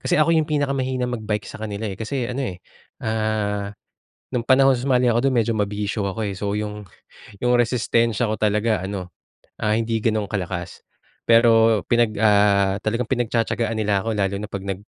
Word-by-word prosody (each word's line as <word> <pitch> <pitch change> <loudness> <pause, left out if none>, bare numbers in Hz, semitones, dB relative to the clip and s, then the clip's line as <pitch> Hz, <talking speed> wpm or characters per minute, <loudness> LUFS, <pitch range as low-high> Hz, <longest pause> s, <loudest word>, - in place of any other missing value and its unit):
kasi - - 0
ako 155 +2 +4
yung 155 -1 +1
pinakamahina 135 -3 -1
mag-bike 110 -3 -3
sa - - -8
kanila, 105 0 -4
eh, 95 - -6
kasi 120 +3 -3
ano, 125 -4 -3
eh, - - -10 0.4
ah, 110 -2 -1 0.6
no'ng 125 -2 -2
panahon 135 0 +5
sumali 125 -1 +2
ako 120 +4 +2
do'n 130 - +1
medyo 115 - -1
mabisyo 105 0 -2
ako, 100 +3 -5
eh. 100 -2 -3
So, 100 0 -2
yung, 105 -1 -5 0.6
yung 125 0 +3
resistensya 115 -1 +1
ko 110 - -2
talaga 105 +1 +1
ano, 95 -1 -5 0.5
ah, 105 0 +2
hindi 115 -1 -1
gano'ng 110 -2 0
kalakas. 90 -3 -4 0.5
Pero 115 -2 +5
pinag, 115 -3 +2
ah, 100 -2 +4
talagang 115 +2 -1
pinagtiya-tiyagaan 115 -2 0
nila 100 -2 +1
ako 115 - -2
lalo 100 -2 0
na - - -4
'pag 100 - -3
nag 95 +1 -4
110 Hz, 170 wpm, -22 LUFS, 105-120 Hz, 0.6 s, panahon